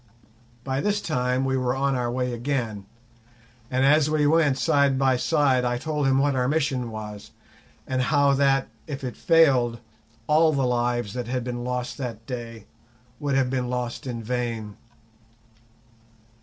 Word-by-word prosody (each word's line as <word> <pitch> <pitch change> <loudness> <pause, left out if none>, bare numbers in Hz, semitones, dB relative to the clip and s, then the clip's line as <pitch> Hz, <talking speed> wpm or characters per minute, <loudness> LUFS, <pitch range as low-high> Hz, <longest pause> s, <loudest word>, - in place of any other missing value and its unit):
By 135 0 -2
this 205 +3 0
time 125 -5 -1
we 130 0 0
were 125 0 0
on 135 +1 0
our 125 -2 -1
way 125 0 -2
again, 115 -5 -3 0.8
and 130 +1 +1
as 150 +1 +4
we 155 -1 +2
went 150 -3 +3
side 140 -1 +2
by 130 -1 +3
side 135 -1 +2
I 120 0 0
told 150 +1 -1
him 135 0 +3
what 140 0 +2
our 125 -1 +1
mission 135 -5 0
was, 105 -2 -8 0.6
and 130 -1 -1
how 140 +1 +3
that, 135 -1 +2 0.2
if 140 -3 -6
it 125 - -4
failed, 130 -8 +3 0.5
all 155 +1 +4
the 135 -2 +1
lives 120 -3 0
that 125 -2 -4
had 125 0 -2
been 120 0 -4
lost 125 +1 -4
that 115 -4 -5
day 115 -3 -7 0.5
would 145 -2 -1
have 130 -2 +1
been 125 -2 -1
lost 125 +1 -4
in 115 -2 -4
vain. 115 -3 -3
130 Hz, 160 wpm, -25 LUFS, 120-140 Hz, 0.8 s, as